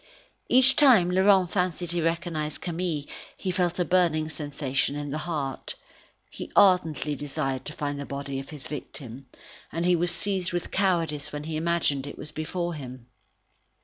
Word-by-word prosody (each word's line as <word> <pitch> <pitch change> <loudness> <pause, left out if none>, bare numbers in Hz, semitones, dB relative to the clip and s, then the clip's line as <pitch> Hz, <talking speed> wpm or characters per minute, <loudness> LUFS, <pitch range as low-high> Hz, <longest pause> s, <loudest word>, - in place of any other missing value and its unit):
Each 260 +1 +6
time 230 -12 +6
Laurent 190 -1 +4
fancied 180 -2 -1
he 175 -1 0
recognised 165 -2 -2
Camille, 170 -3 -2 0.3
he 185 - -2
felt 175 -1 0
a 180 - +1
burning 165 -4 +2
sensation 145 -3 -1
in 145 -1 -4
the 155 - -2
heart. 140 -5 -3 0.6
He - - -8
ardently 160 -6 +4
desired 135 -2 -3
to 150 - -5
find 145 -1 -3
the 140 - -4
body 140 -1 -4
of 135 - -9
his 150 -3 -8
victim, 135 -3 -8 0.4
and 165 +2 -2
he 180 0 +4
was 175 +1 +1
seized 190 -1 0
with 175 - -3
cowardice 170 -6 0
when 150 0 -5
he 160 +1 -4
imagined 155 -4 0
it 150 +1 -7
before 170 +3 -3
him. 130 -4 -9
160 Hz, 160 wpm, -27 LUFS, 145-180 Hz, 0.6 s, Each